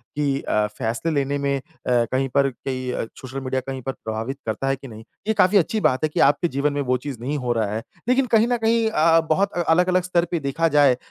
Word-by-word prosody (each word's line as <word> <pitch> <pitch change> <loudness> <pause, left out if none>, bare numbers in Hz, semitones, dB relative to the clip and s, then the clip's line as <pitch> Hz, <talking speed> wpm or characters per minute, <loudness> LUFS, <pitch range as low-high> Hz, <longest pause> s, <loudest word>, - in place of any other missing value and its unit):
कि 140 -2 0
अ, 105 0 +1
फ़ेेसले 115 +8 -2
लेने 140 -1 0
में 140 0 0
अ, 135 - -6 0.3
कहीं 125 +2 +1
पर 140 +1 +2
कि 130 -1 -4 0.2
सोशल 130 +1 -6
मीडिया 130 0 -2
कहीं 135 -1 -4
पर 135 - -3
प्रभावित 115 +4 -5
करता 110 +5 -2
है 135 - +2
कि 135 0 -12
नहीं? 110 -1 -11 0.2
ये 220 - +3
काफ़ी 205 -1 +4
अच्छी 200 +4 +1
बात 130 +3 +2
है 155 - +2
कि - - -1
आपके 145 +5 +4
जीवन 140 0 -1
में 145 - -1
वो 125 -1 +1
चीज़ 130 -1 -7
नहीं 140 +5 -2
हो 125 -3 -2
रहा 110 -3 -1
है, 110 - -4 0.3
लेकिन 255 +1 +3
कहीं 225 +2 +4
न 245 - +1
कहीं 225 0 +2
अ, 165 -5 +4
बहुत 195 +5 +2
अलग-अलग 180 +2 +2
स्तर 175 -1 +1
पे 170 - 0
देखा 150 +4 0
जाए 140 -3 +6
अ, - - -6
140 Hz, 245 wpm, -22 LUFS, 130-165 Hz, 0.3 s, जाए